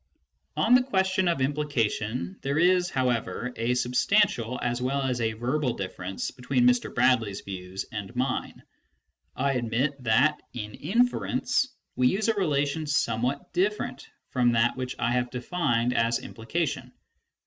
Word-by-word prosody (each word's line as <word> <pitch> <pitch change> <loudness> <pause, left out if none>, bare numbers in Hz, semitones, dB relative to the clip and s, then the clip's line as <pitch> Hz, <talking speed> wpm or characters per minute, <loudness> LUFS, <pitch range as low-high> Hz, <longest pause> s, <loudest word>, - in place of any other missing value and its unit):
On 235 - +4
the 250 - +7
question 190 -6 +1
of 170 -6 +1
implication, 120 -9 -1
there 140 +2 -1
is 180 +1 +4
however 125 -1 -1
a 115 +2 0
substantial 125 - +2
as 120 0 -1
well 135 +2 0
as 125 -2 -1
a 110 -1 0
verbal 125 +3 -1
difference 95 -1 -4
between 125 -1 0
Mr. 125 0 +2
Bradley's 115 -5 +2
views 95 0 -6
and 105 +2 -6
mine. 130 +1 -2 0.7
I 140 +2 +1
admit 125 +3 0
that, 130 +7 +3
in 105 -3 -6
inference, 245 - +1 0.3
we 125 - +3
use 210 - +1
a - - +4
relation 155 -5 0
somewhat 125 -1 -1
different 425 +3 -1 0.2
from 120 -2 +3
that 115 +1 +3
which 130 -1 -4
I 120 0 0
have 125 0 0
defined 125 -3 0
as 115 0 +2
implication. 150 +9 -4
125 Hz, 140 wpm, -27 LUFS, 115-155 Hz, 0.7 s, the